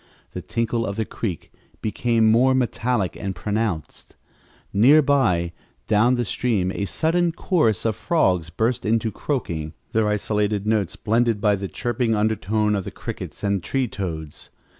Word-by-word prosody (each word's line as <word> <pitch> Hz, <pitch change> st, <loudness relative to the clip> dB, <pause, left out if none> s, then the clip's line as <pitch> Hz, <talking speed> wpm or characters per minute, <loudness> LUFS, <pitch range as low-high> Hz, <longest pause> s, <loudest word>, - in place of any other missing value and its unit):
The -, -, -6 dB
tinkle 115 Hz, 0 st, -1 dB
of 100 Hz, -, -3 dB
the 110 Hz, 0 st, -1 dB
creek 95 Hz, -8 st, -5 dB, 0.3 s
became 110 Hz, 0 st, +2 dB
more 130 Hz, +3 st, +4 dB
metallic 120 Hz, -6 st, 0 dB
and 95 Hz, -1 st, -4 dB
pronounced. 105 Hz, -3 st, -3 dB, 0.6 s
Near 125 Hz, +10 st, +6 dB
by, 100 Hz, -13 st, +2 dB, 0.3 s
down 110 Hz, +4 st, +3 dB
the 120 Hz, -1 st, -1 dB
stream, 100 Hz, -4 st, 0 dB
a 100 Hz, -, -2 dB
sudden 165 Hz, -, +1 dB
chorus 155 Hz, -, +1 dB
of 110 Hz, -2 st, +1 dB
frogs 90 Hz, -, +1 dB
burst 115 Hz, +7 st, -1 dB
into 110 Hz, 0 st, +1 dB
croaking, 85 Hz, -, -3 dB, 0.2 s
their 110 Hz, -1 st, +2 dB
isolated 105 Hz, -1 st, 0 dB
notes 105 Hz, -5 st, 0 dB
blended 115 Hz, 0 st, +1 dB
by 105 Hz, -1 st, +3 dB
the 100 Hz, 0 st, -4 dB
chirping 120 Hz, +2 st, -1 dB
undertone 105 Hz, 0 st, +1 dB
of 100 Hz, -2 st, -1 dB
the -, -, -5 dB
crickets -, -, -7 dB
and 100 Hz, -2 st, +1 dB
tree 135 Hz, +4 st, 0 dB
toads. 80 Hz, -8 st, -6 dB
110 Hz, 150 wpm, -23 LUFS, 100-120 Hz, 0.6 s, Near